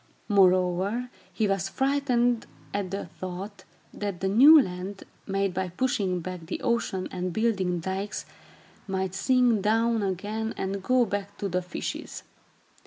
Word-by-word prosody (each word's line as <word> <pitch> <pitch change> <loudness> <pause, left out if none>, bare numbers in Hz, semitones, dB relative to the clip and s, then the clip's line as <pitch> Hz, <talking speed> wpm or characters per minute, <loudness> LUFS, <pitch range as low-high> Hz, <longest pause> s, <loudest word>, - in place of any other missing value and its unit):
Moreover, 190 +4 +3 0.2
he 220 - 0
was 195 -1 0
frightened 250 -2 +1 0.3
at 200 -2 -2
the 195 +2 -4
thought 185 +3 -7 0.3
that 200 -4 -4
the 190 - -1
new 275 +11 +8
land, 190 -3 -3 0.2
made 195 -1 0
by 185 0 -2
pushing 190 -3 0
back 180 -2 -7
the - - -3
ocean 235 -6 0
and 180 0 -3
building 190 -4 0
dykes, 190 +4 -3 0.6
might 190 -1 -2
sink 245 +1 +3
down 225 +2 +2
again 205 +4 -2
and 195 +1 -2
go 255 +4 +3
back 200 -1 -4
to 200 - -2
the 180 -1 0
fishes. 180 -1 -6
195 Hz, 140 wpm, -27 LUFS, 185-225 Hz, 0.6 s, new